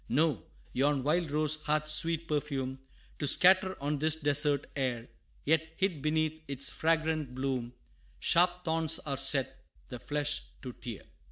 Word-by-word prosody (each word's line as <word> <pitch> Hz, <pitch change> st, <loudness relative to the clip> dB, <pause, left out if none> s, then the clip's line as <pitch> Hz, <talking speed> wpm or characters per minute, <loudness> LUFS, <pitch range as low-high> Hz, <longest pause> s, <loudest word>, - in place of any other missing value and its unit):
No 140 Hz, -, +1 dB, 0.3 s
yon 140 Hz, 0 st, +1 dB
wild 160 Hz, +3 st, +1 dB
rose 155 Hz, +1 st, 0 dB
hath 150 Hz, 0 st, +1 dB
sweet 165 Hz, +1 st, +1 dB
perfume 135 Hz, -3 st, -2 dB, 0.4 s
To 145 Hz, -, 0 dB
scatter 185 Hz, +4 st, +5 dB
on 145 Hz, +1 st, -2 dB
this 155 Hz, +1 st, +3 dB
desert 145 Hz, -2 st, +1 dB
air; 125 Hz, -4 st, -2 dB, 0.4 s
Yet, 160 Hz, +1 st, +1 dB
hid 185 Hz, -7 st, -1 dB
beneath 155 Hz, +1 st, 0 dB
its 140 Hz, 0 st, -3 dB
fragrant 160 Hz, -4 st, 0 dB
bloom, 130 Hz, -2 st, -3 dB, 0.4 s
Sharp 175 Hz, +1 st, +2 dB
thorns 160 Hz, -1 st, +2 dB
are 140 Hz, -3 st, -4 dB
set, 135 Hz, -1 st, +1 dB, 0.3 s
the 125 Hz, -, -7 dB
flesh 145 Hz, +1 st, -2 dB, 0.2 s
to 125 Hz, -2 st, -6 dB
tear. 115 Hz, -3 st, -8 dB
150 Hz, 145 wpm, -30 LUFS, 135-160 Hz, 0.4 s, scatter